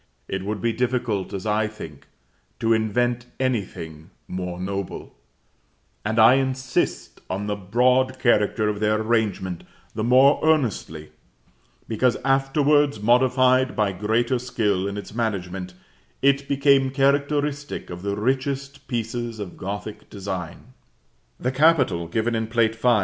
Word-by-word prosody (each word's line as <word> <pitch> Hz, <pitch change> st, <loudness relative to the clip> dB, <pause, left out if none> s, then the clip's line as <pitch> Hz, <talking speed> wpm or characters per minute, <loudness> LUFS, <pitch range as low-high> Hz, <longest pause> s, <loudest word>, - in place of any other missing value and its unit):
It 95 Hz, 0 st, -3 dB
would 105 Hz, 0 st, -3 dB
be 115 Hz, -1 st, +1 dB
difficult, 120 Hz, -4 st, -1 dB
as 95 Hz, 0 st, -5 dB
I 105 Hz, 0 st, +1 dB
think, 80 Hz, -9 st, -10 dB, 0.5 s
to 115 Hz, 0 st, +2 dB
invent 120 Hz, +2 st, 0 dB
anything 95 Hz, -11 st, -3 dB, 0.2 s
more 90 Hz, -1 st, -5 dB
noble; 95 Hz, 0 st, -5 dB, 0.9 s
and 110 Hz, +2 st, -2 dB
I 110 Hz, +2 st, +8 dB
insist 130 Hz, -1 st, -2 dB
on 100 Hz, +2 st, -3 dB
the 105 Hz, 0 st, -1 dB
broad 125 Hz, +6 st, +2 dB
character 110 Hz, -3 st, +2 dB
of 105 Hz, -1 st, -1 dB
their 110 Hz, 0 st, +1 dB
arrangement 110 Hz, -6 st, -1 dB, 0.3 s
the 110 Hz, -, -3 dB
more 130 Hz, +4 st, +5 dB
earnestly, 115 Hz, -, 0 dB, 0.8 s
because, 120 Hz, +2 st, +1 dB
afterwards 140 Hz, 0 st, +2 dB
modified 130 Hz, +3 st, +3 dB
by 105 Hz, -3 st, +1 dB
greater 110 Hz, +6 st, 0 dB
skill 105 Hz, -6 st, -1 dB
in 100 Hz, 0 st, -4 dB
its 100 Hz, -, -8 dB
management, 95 Hz, -5 st, -3 dB, 0.5 s
it 140 Hz, 0 st, +3 dB
became 140 Hz, -1 st, +3 dB
characteristic 145 Hz, +1 st, 0 dB
of 90 Hz, 0 st, -7 dB
the 100 Hz, +1 st, -2 dB
richest 135 Hz, +4 st, -2 dB
pieces 120 Hz, -1 st, -3 dB
of 100 Hz, -4 st, -6 dB
Gothic 100 Hz, +2 st, -6 dB
design. 95 Hz, +3 st, -6 dB, 0.7 s
The 125 Hz, -, -1 dB
capital, 130 Hz, -, +3 dB
given 110 Hz, +7 st, -1 dB
in 110 Hz, -1 st, -1 dB
Plate 115 Hz, -1 st, +1 dB
V. 120 Hz, +2 st, +1 dB
115 Hz, 130 wpm, -23 LUFS, 100-130 Hz, 0.9 s, I